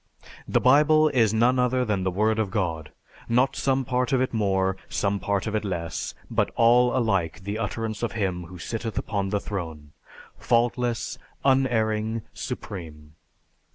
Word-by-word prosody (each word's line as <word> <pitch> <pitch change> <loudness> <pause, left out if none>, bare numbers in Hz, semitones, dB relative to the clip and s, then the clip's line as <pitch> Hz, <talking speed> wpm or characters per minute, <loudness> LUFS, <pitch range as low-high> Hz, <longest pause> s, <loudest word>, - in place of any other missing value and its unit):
The - - +2
Bible 150 +4 +5
is 115 -7 +3
none 120 +3 +3
other 125 0 +2
than 105 -4 0
the 95 - 0
Word 110 +4 +1
of 110 -3 0
God, 85 -6 -2 0.4
not 125 +3 +2
some 135 -1 0
part 125 +2 0
of 130 - +3
it 130 -1 0
more, 95 -3 +1
some 100 +6 0
part 100 -1 -1
of 110 - -3
it 110 - 0
less, 85 -5 -4
but - - 0
all 120 +2 +4
alike 95 -7 0
the 100 +3 -3
utterance 110 0 -3
of 120 - -2
Him 95 -5 -2
who 90 +2 -11
sitteth 115 +5 -5
upon 100 -3 -1
the 105 +1 0
throne, 80 -8 -6 0.5
faultless, 120 0 0 0.3
unerring, 110 -5 +1
supreme." 75 -5 -7
110 Hz, 155 wpm, -25 LUFS, 95-120 Hz, 0.5 s, Bible